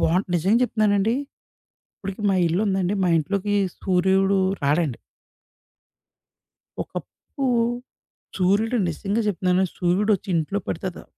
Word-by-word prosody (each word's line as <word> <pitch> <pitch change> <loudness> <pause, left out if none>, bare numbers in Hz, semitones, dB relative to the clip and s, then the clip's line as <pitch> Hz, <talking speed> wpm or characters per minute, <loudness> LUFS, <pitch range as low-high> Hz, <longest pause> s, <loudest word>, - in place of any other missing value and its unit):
బా - - +2 0.2
నిజంగా 190 +7 +3
జెప్తున్నానండి, 215 -2 +2 0.8
ఇప్పటికి 195 0 -6
మా 195 - +2
ఇల్లు 170 +4 0
ఉందండి. 190 -1 0
మా 180 - +2
ఇంట్లోకి 200 +6 -1 0.3
సూర్యుడు 190 +1 +2 0.2
రాడండి. 145 -2 +1 1.9
ఒకప్పుడు, 275 -2 -6 0.9
సూర్యుడు 205 +6 +2
నిజంగా 200 +7 -2
జెప్తున్నాను, 185 -1 +1
సూర్యుడొచ్చి 195 +3 +1
ఇంట్లో 165 +5 -1
పడతే, 175 +1 -4
190 Hz, 95 wpm, -23 LUFS, 180-205 Hz, 1.9 s, నిజంగా